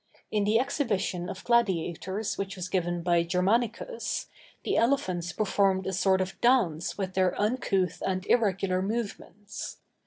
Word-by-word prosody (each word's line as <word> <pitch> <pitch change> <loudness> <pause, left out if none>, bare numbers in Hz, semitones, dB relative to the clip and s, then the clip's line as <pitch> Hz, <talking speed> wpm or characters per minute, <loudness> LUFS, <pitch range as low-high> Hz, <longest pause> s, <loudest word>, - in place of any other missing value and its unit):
In 210 -2 +1
the 215 +2 +4
exhibition 205 - -1
of 190 - -7
gladiators 195 -3 0
which 195 0 -4
was 185 -1 -5
given 175 -2 -1
by 175 -1 +3
Germanicus, 220 - -1 0.3
the - - 0
elephants 185 -9 +1
performed 195 -2 +1
a 190 - -2
sort 190 +1 +3
of 185 0 -4
dance 215 -11 +2
with 190 -2 -3
their 185 -1 +1
uncouth 205 -4 0
and 185 0 -1
irregular 195 -5 +2
movements. 210 0 -5
190 Hz, 135 wpm, -28 LUFS, 185-220 Hz, 0.3 s, the